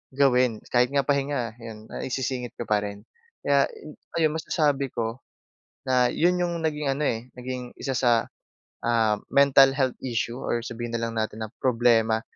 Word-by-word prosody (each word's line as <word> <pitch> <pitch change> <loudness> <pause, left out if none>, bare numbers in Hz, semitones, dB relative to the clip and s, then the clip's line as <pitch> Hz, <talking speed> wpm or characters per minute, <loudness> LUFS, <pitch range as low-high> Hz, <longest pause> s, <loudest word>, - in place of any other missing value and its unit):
gawin. 125 -5 +3
Kahit 125 0 +4
nga 140 -1 +2
pahinga, 140 -4 0
'yon, 110 -2 -9
naisisingit 130 -1 -3
ko - - -4
pa 105 -1 +2
rin. 100 0 -6 0.4
Kaya, 140 -1 +3
eh, 150 - -12 0.2
ayun, 160 -2 +3
masasabi 145 -4 +1
ko 115 +1 -3 0.7
na 125 -1 +3
'yon 175 +2 +2
'yong 175 -1 -1
naging 150 -3 0
ano, 140 +3 -2
eh, 120 +2 -3
naging 125 0 -5
1 135 -2 -2
sa, 120 -2 +3 0.6
ah, 115 -3 +2 0.2
mental 135 -1 +6
health 130 -2 0
issue, 120 -1 -2
or 120 -2 -2
sabihin 120 0 -6
na 115 - -1
lang 115 0 -3
natin 110 0 -2
ng 110 -1 -5
problema, 115 -3 +3
125 Hz, 165 wpm, -25 LUFS, 115-140 Hz, 0.7 s, mental